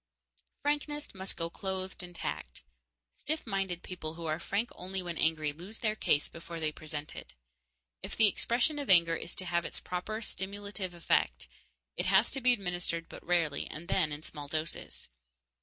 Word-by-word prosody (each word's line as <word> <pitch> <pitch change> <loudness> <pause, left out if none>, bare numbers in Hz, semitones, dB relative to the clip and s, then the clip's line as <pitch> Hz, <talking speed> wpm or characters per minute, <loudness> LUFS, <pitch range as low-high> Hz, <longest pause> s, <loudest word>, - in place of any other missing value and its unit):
Frankness 295 0 0
must 190 0 -3
go 165 0 -2
clothed 190 -1 -3
in 175 0 -8
tact. 60 - -4 0.5
Stiff 315 +2 -2
minded 195 -4 -1
people 165 -3 -5
who 170 0 -6
are 155 0 0
frank 205 +7 0
only 190 +1 -2
when 175 -1 -3
angry 155 -2 +2
lose 185 +8 -7
their 215 -2 +1
case 150 -8 +3
before 165 0 -7
they 155 -1 +2
present 150 -1 -4
it. - - -9 0.7
If - - -5
the 220 - +7
expression 240 +8 +3
of 280 - -4
anger 170 -3 +8
is 170 - -4
to 185 - -2
have 170 -1 +2
its - - -4
proper 215 +5 -3
stimulative 200 -1 -3
effect, 170 - +2 0.5
it - - 0
has - - +6
to 270 - -2
be 250 0 +7
administered 180 -6 0
but - - -9
rarely, 165 -5 +2
and 165 +3 -7
then 155 -5 +3
in 150 +1 -4
small 145 -2 -6
doses. 155 +2 -3
180 Hz, 175 wpm, -32 LUFS, 165-200 Hz, 0.7 s, anger